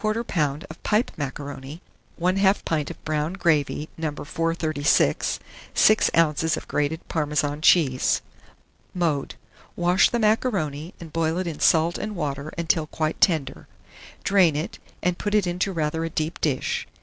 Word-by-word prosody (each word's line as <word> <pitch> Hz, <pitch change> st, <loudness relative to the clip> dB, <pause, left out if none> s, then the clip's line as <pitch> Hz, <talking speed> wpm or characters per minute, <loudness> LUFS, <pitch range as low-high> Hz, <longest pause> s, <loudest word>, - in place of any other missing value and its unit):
of 175 Hz, -10 st, -1 dB
pipe 215 Hz, +3 st, +1 dB
macaroni, 145 Hz, +1 st, -6 dB, 0.4 s
1/2 190 Hz, +3 st, +2 dB
pint 150 Hz, -3 st, -1 dB
of -, -, -11 dB
brown 155 Hz, +2 st, -1 dB
gravy 155 Hz, -5 st, +1 dB
No. 160 Hz, -2 st, -1 dB
436, 155 Hz, 0 st, 0 dB, 0.4 s
6 215 Hz, -, +5 dB
oz. 160 Hz, -1 st, +2 dB
of -, -, -8 dB
grated 150 Hz, +3 st, -2 dB
Parmesan 150 Hz, -1 st, -1 dB
cheese. 140 Hz, -7 st, +4 dB, 0.7 s
Mode. 160 Hz, -6 st, -1 dB, 0.4 s
Wash 175 Hz, +2 st, +4 dB
the 240 Hz, -, 0 dB
macaroni, 195 Hz, -, 0 dB
and 165 Hz, -3 st, -10 dB
boil 165 Hz, 0 st, 0 dB
it 185 Hz, -, -1 dB
in 165 Hz, -4 st, -5 dB
salt 165 Hz, +1 st, +3 dB
and 210 Hz, -1 st, -4 dB
water 145 Hz, -2 st, -3 dB
until 165 Hz, -2 st, +1 dB
quite 155 Hz, 0 st, -2 dB
tender; 150 Hz, -7 st, +1 dB, 0.6 s
drain 185 Hz, -6 st, +4 dB
it, 155 Hz, +3 st, -4 dB, 0.2 s
and 180 Hz, 0 st, 0 dB
put 205 Hz, 0 st, -1 dB
it 210 Hz, -3 st, +3 dB
into 180 Hz, +2 st, -1 dB
rather 160 Hz, -1 st, -1 dB
a 165 Hz, -, -2 dB
deep 155 Hz, 0 st, -3 dB
dish. 140 Hz, -5 st, -1 dB
160 Hz, 140 wpm, -24 LUFS, 150-180 Hz, 0.7 s, 6